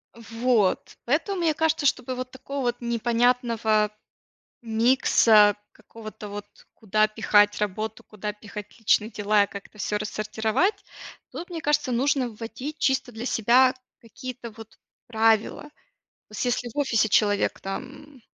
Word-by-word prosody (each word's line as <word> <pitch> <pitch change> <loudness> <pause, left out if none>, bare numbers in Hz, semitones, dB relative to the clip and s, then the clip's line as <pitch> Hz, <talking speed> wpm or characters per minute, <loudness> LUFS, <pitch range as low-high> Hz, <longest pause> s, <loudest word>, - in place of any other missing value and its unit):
Вот. 230 -3 0
Поэтому, 335 - 0
мне 325 -2 +2
кажется, 320 -1 0
чтобы 255 -1 0
вот 255 0 -5
такого 275 +2 -6
вот 240 - -1
непонятного 235 -2 +1 0.7
микса, 225 -2 +4 0.2
какого-то 215 -1 -11
вот: 205 0 -7 0.3
куда 215 0 +1
пихать 205 -1 +3
работу, 215 +2 -3
куда 210 0 -6
пихать 210 +1 -10
личные 220 0 +2
дела 205 -1 +2
и - - -5
как-то 200 +1 -11
всё 210 - -2
рассортировать, 220 - -1 0.6
тут, 350 - -7
мне 335 -2 -5
кажется, 290 -3 +1
нужно 260 +1 +1
вводить 240 +7 -7
чисто 265 -2 +1
для 225 +2 -7
себя 255 +4 +4 0.3
какие-то 240 +1 -8
вот 225 0 -14 0.3
правила. 225 +2 +2
То 295 - -13 0.7
есть 230 - -2
если 245 0 -1
в - - -14
офисе 225 -6 +2
человек 205 0 +2
там, 260 +7 -8
230 Hz, 135 wpm, -25 LUFS, 215-255 Hz, 0.7 s, микса